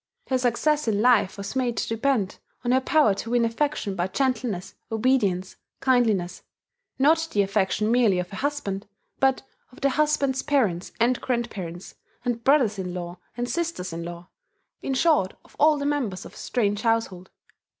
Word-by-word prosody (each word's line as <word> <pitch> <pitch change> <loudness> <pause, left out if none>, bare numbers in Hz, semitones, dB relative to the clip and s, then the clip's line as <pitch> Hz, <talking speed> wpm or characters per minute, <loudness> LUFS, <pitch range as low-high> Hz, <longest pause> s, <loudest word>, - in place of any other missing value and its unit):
Her 260 -1 +2
success 260 +4 +1
in 210 -2 +1
life 220 -4 +3
was 200 +4 -6
made 245 -3 0
to - - -1
depend 225 -3 0 0.3
on 240 - +2
her 260 +1 +4
power 290 -5 +4
to 210 +3 -6
win 240 -1 +3
affection 230 -3 -1
by 175 0 0
gentleness, 220 -4 -1 0.2
obedience, 215 -6 +1 0.2
kindliness; 220 -9 +1 0.6
not 320 +4 +3
the 205 - +3
affection 200 +2 +1
merely 235 -6 +4
of 180 +1 -4
a - - -5
husband, 215 -8 -3 0.3
but 265 -1 +2 0.3
of 250 - -15
the 275 - +3
husband's 285 -3 +1
parents 210 - 0
and 240 +2 +2
grandparents, 200 -8 -4 0.3
and 235 -1 -1
brothers 250 -7 +3
in 180 -1 -4
law 175 0 -6 0.2
and 240 0 -1
sisters 330 - -3
in 170 0 -4
law, 175 +1 -8 0.5
in 270 - -2
short 295 - +2
of - - -21
all 305 0 +5
the 285 - -3
members 255 -11 -1
of - - -11
a - - -14
strange 205 -4 -1
household. 225 -6 0
230 Hz, 170 wpm, -25 LUFS, 195-265 Hz, 0.6 s, all